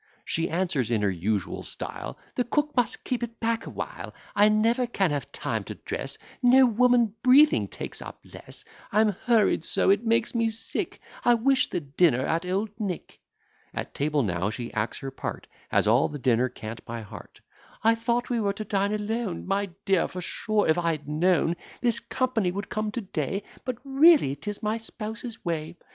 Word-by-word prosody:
She 165 +1 -1
answers, 170 - 0
in 110 -3 +1
her 100 - +2
usual 95 +3 -2
style, 60 - -6 0.2
"The 250 - +1
cook 295 +5 0
must 245 -3 0
keep 250 -1 -2
it 235 -1 -5
back 230 0 -1
a - - -4
while; - - -6 0.2
I 205 +1 +6
never 230 +4 +2
can 195 -8 +1
have 145 -1 -3
time - - -2
to - - -6
dress, - - -5 0.2
No 260 +1 +7
woman 240 -2 +3
breathing 280 +4 +6
takes - - -6
up - - -9
less; - - -8 0.3
I'm 215 +1 +4
hurried 215 -2 +2
so, 190 - +3
it 200 +3 +2
makes 230 0 +2
me 230 -1 +2
sick; 225 0 -2 0.2
I 240 - +5
wish 265 +3 +3
the 175 - -2
dinner 140 -2 +2
at 165 +2 -1
Old 200 +3 -1
Nick." 195 -6 -4 0.6
At - - -4
table 145 0 +1
now 90 -1 0
she 115 +2 -5
acts 110 +1 -1
her 135 -1 -5
part, 135 - -5 0.2
Has - - +3
all 115 +5 +4
the 150 - -5
dinner 125 -2 +2
cant 115 -2 -8
by 115 0 -6
heart: 105 - -12 0.4
"I 225 +1 +6
thought 235 +2 -1
we 235 -2 +1
were 200 -1 +1
to 215 - -5
dine 200 +1 +1
alone, 210 -3 -3
My 195 +1 0 0.2
dear; 195 -4 +3
for 180 - -7
sure, 215 +4 0
if 160 +2 +3
I 170 -1 +1
had 150 -2 -7
known 170 +2 +2 0.2
This 235 -1 +2
company 235 -4 0
would 200 +2 -5
come 215 0 -1
to 240 - -2
day 195 0 -3 0.2
But 250 -2 -2
really 275 - +5
'tis 205 +10 -6
my 215 +1 0
spouse's 225 +1 -6
way! 165 0 -3
205 Hz, 190 wpm, -26 LUFS, 155-230 Hz, 0.6 s, No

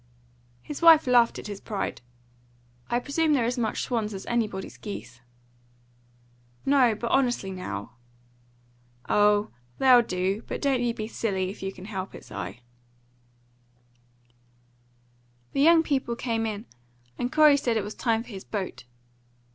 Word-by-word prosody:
His 295 - -7
wife 330 -2 +8
laughed 240 -2 +4
at - - -8
his 205 -2 -7
pride. 205 - -4 0.9
"I 240 - +1
presume 300 +5 +1
they're 255 -5 +2
as 245 +2 -1
much 220 -2 -1
swans 220 -4 -2
as 190 - -7
anybody's 215 -5 -2
geese." 125 - -8 1.4
"No; 265 -5 +4
but 235 +2 -4
honestly, 245 -7 +1
now!" 145 - -6 1.2
"Oh, 210 0 +3 0.3
they'll 255 -2 +7
do; 190 -1 -1
but - - -4
don't 270 -3 +1
you 240 -1 0
be 215 - -4
silly, 190 -5 -2
if 200 - -12
you 195 0 -3
can 185 -1 -12
help 195 -2 -6
it, - - -11
Si." 105 +3 -7 2.9
The 275 - +1
young 325 +2 +6
people 265 -6 -1
came 230 -2 -1
in, 215 +1 -5 0.5
and 245 +1 -1
Corey 305 -2 +6
said 240 -5 0
it 215 - -1
was 210 +1 -6
time 230 -2 0
for - - -16
his 195 -4 -8
boat. 195 - -5
225 Hz, 145 wpm, -26 LUFS, 200-255 Hz, 2.9 s, wife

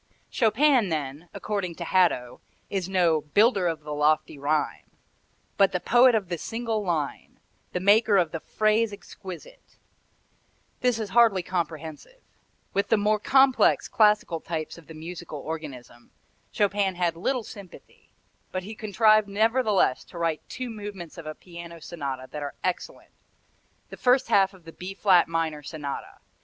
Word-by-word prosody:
Chopin 240 0 +3
then, 150 +1 -4
according 195 -5 -3
to 170 - -6
Hadow, 170 -9 +1 0.3
is 190 -2 -2
no 175 -5 +3
"builder 200 - +3
of 165 -2 -2
the 150 0 -6
lofty 150 0 +1
rhyme," 150 +2 -1 0.7
but 195 -1 +4
the 180 - 0
poet 245 +4 +5
of 205 -4 -1
the 170 -1 -4
single 225 0 -3
line, 160 -6 -3 0.3
the 180 - -2
maker 205 +2 +4
of 170 -4 +2
the 165 - -4
phrase 215 +5 +1
exquisite. 200 - -11 1.0
This 250 -2 +2
is 215 -3 -4
hardly 225 -5 +4
comprehensive. 165 - -5 0.5
With 200 - +1
the 225 - +3
more 210 +1 +2
complex, 265 +3 +4
classical 210 -6 +3
types 160 -1 -5
of 170 -3 -15
the 160 - -11
musical 165 0 -7
organism 140 -6 -8 0.4
Chopin 200 -2 +1
had 175 -2 0
little 240 +8 -1
sympathy, 200 -4 -13 0.4
but 185 0 -3
he 210 +4 -7
contrived 215 0 +3
nevertheless 215 - +2
to 175 - -12
write 165 -2 -1
two 255 -2 -5
movements 205 -6 -8
of 160 - -9
a 155 - -5
piano 170 -1 -10
sonata 140 -6 -5
that 150 - -6
are 145 -1 -5
excellent 185 - -4 0.8
the - - -8
first 255 +1 +3
half 195 0 +3
of 180 -3 -20
the 165 - -11
B 185 +2 -7
flat 190 -3 +4
minor 165 -2 -2
Sonata. 145 -2 -6
185 Hz, 150 wpm, -26 LUFS, 160-215 Hz, 1.0 s, poet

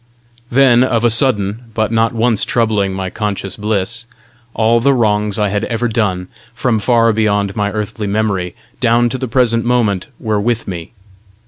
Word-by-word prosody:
Then, 125 -1 +4
of 120 -3 0
a 120 - +4
sudden, 115 -2 +1
but 110 -1 0
not 115 0 +2
once 115 -2 +1
troubling 110 -4 +1
my 95 -1 -4
conscious 100 -3 -3
bliss, 110 +2 -2 0.5
all 115 +1 +3
the 140 +3 +3
wrongs 105 -3 +1
I 105 -2 +1
had 105 +2 -1
ever 115 +1 -1
done, 100 -6 -1 0.3
from 115 -1 0
far 115 0 +3
beyond 105 -2 0
my 105 -2 -1
earthly 105 0 -4
memory 100 -4 -1 0.2
down 120 0 +3
to 130 - -4
the 130 - -3
present 115 -1 +2
moment, 115 -6 0
were 105 -2 -1
with 115 +1 -1
me. 90 -1 -6
110 Hz, 165 wpm, -16 LUFS, 105-120 Hz, 0.5 s, Then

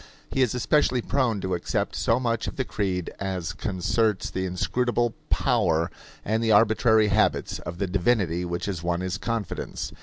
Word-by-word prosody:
He 135 - +1
is 125 -2 +2
especially 125 -1 +2
prone 120 -7 0
to 95 0 -2
accept 85 - -1
so 115 +2 +2
much 115 -3 -1
of - - -4
the 130 - -1
creed 95 -6 -2
as 95 -2 -3
concerts 100 +2 0
the 95 0 -2
inscrutable 120 +6 0 0.2
power 80 0 +2 0.3
and 110 +2 0
the 110 - +2
arbitrary 110 0 +4
habits 105 +2 +1
of 85 - -7
the 100 - 0
divinity 90 -2 +1
which 85 0 -3
has 95 -5 -3
won 85 0 -1
his 95 +2 -3
confidence. 115 -4 -3
105 Hz, 170 wpm, -25 LUFS, 90-115 Hz, 0.3 s, arbitrary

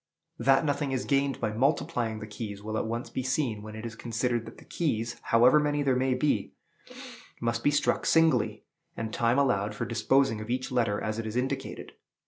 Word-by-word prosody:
That 135 +5 +4
nothing 145 -1 0
is 130 -1 -1
gained 140 -1 +1
by 105 - -1
multiplying 125 -2 0
the - - -5
keys, 105 -1 -7
will 110 +1 -4
at 110 - -1
once 115 +2 -4
be - - -2
seen 125 -4 -1
when 110 0 -9
it 110 +1 -7
is 115 - -5
considered 115 0 -2
that - - -11
the - - -15
keys, 120 -8 -2
however 125 +6 +6
many 145 -1 0
there 135 -2 +2
may 130 0 +1
be, 145 +3 0 0.9
must 115 0 -1
be - - +4
struck 145 0 +1
singly, 165 -1 +3 0.3
and 110 -1 -4
time 120 +2 +2
allowed 105 -7 +1
for - - -3
disposing 115 -1 +2
of 110 - -8
each 130 +2 -2
letter 115 -5 +1
as 110 +1 -3
it 115 - -3
is 110 - -5
indicated. 125 +2 -3
120 Hz, 200 wpm, -28 LUFS, 110-135 Hz, 0.9 s, however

